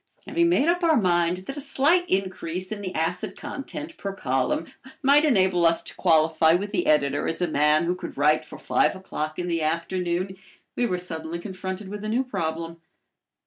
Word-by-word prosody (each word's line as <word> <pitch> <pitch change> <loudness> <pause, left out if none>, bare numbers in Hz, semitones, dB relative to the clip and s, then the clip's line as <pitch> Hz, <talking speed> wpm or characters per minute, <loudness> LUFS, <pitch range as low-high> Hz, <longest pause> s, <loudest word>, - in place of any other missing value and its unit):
Having 340 0 +2
made 325 -3 +3
up 350 +1 +2
our 320 -3 +4
mind 175 -2 +2
that 275 - -6
a - - -4
slight 315 +6 +2
increase 185 -1 -2
in 210 -1 -4
the 185 -2 -5
acid 180 +5 -2
content 295 +2 -7
per 200 - -4
column 135 +1 0 0.4
might 285 +3 +5
enable 190 - +3
us 165 0 +3
to - - -6
qualify 160 -1 +4
with 200 +4 -1
the 210 - -1
editor 145 -2 +2
as 165 - -1
a 175 - +1
man 150 +1 +3
who 175 +1 +1
could 180 - -8
write 150 +2 +3
for - - -11
five - - +1
o'clock 155 -5 -5
in 180 - -3
the 165 -2 -1
afternoon, 175 +3 -1 0.4
we 245 - +1
were 180 - -1
suddenly 165 -2 -5
confronted 190 +2 -6
with 205 +1 -7
a 215 - -3
new 240 +4 +1
problem. 165 -7 -4
180 Hz, 190 wpm, -25 LUFS, 165-215 Hz, 0.4 s, might